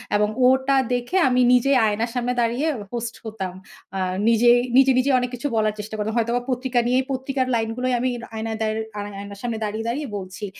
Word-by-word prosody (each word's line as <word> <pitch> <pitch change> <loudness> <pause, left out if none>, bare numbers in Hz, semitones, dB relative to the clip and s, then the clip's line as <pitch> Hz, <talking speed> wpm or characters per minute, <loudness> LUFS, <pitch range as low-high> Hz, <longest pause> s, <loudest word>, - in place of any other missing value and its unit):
এবং 210 0 +2 0.2
ওটা 265 +1 +3 0.2
দেখে 245 +9 -1
আমি 250 0 +3
নিজে 250 +2 +3
আয়নার 220 +2 0
সামনে 245 0 0
দাঁড়িয়ে 240 +6 0 0.3
হোস্ট 235 -1 -4
হতাম। 195 -5 -5 0.4
আ - - -1 0.3
নিজেই 240 +1 +5 0.2
নিজে, 270 0 +6
নিজে 275 +2 +2
অনেক 250 0 -2
কিছু 250 +4 -3
বলার 215 -1 +2
চেষ্টা 215 +1 -6
করতাম। 215 +1 -2
হয়তোবা 235 +1 +1
পত্রিকা 255 0 0
নিয়েই 255 +2 +2
পত্রিকার 265 0 -1
লাইনগুলোই 230 +3 -1
আমি 255 +2 0 0.3
আয়নায় 220 0 -3
দার 215 0 0 0.2
আ - - -3 0.2
আয়নার 200 0 -9
সামনে 235 -2 -2
দাঁড়িয়ে, 215 +1 -3
দাঁড়িয়ে 280 +5 -2
বলছি 190 +2 -7
235 Hz, 185 wpm, -23 LUFS, 220-255 Hz, 0.4 s, নিজে